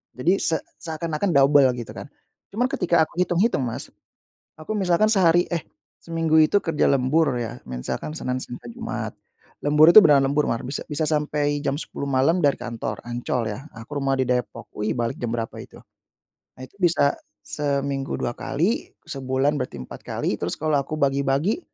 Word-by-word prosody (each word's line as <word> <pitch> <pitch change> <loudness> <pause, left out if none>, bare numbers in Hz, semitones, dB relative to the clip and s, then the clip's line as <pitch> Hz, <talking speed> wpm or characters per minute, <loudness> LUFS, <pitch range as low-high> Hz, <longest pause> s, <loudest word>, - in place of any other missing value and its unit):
Jadi 140 +8 +1
se 160 - +2 0.2
seakan-akan 165 +2 -2
dobel 140 0 +6
gitu 120 -2 -7
kan. - - -8 0.5
Cuman 245 +3 +2
ketika 170 -2 +2
aku 170 - -7
hitung-hitung, 180 - +2
Mas, 115 - -6 0.7
aku 155 +7 -6
misalkan 205 +1 +2
sehari 175 -4 +4
eh 170 - 0 0.4
seminggu 165 -1 +2
itu 185 +6 +3
kerja 165 -3 +1
lembur 140 +1 +2
ya, 120 0 -4
misalkan 65 - -4
Senin 125 -5 -2
sampai 120 -1 -8
Jumat. - - -5 0.5
Lembur 150 +3 +6
itu 215 - +11
beneran 145 -5 +5
lembur 145 +2 +1
mar, 115 - -2
bisa 135 +3 -3
bisa 150 +1 0
sampai 150 -1 0
jam 140 -1 -1
10.00 140 - -4
malam 140 +7 +2
dari 145 -4 +3
kantor, 115 -3 -5
Ancol 120 -1 -2
ya. 135 +9 -9
Aku 140 +6 -6
rumah 135 0 +1
di 130 - +2
Depok, 125 -1 -2
wih 105 +1 -2
balik 120 -1 -2
jam 120 - -2
berapa 115 -1 -3
itu. - - -14 0.8
Nah 130 - -10
itu - - -31
bisa 165 -6 +3 0.3
seminggu 140 -2 -2
2 120 - -2
kali, 150 - -1 0.2
sebulan 135 +2 -1
berarti 125 - -4
4 - - -10
kali. - - -2
Terus 85 - -1
kalau 155 -2 +1
aku 140 +3 -4
bagi-bagi 140 - +1
145 Hz, 170 wpm, -23 LUFS, 130-160 Hz, 0.8 s, itu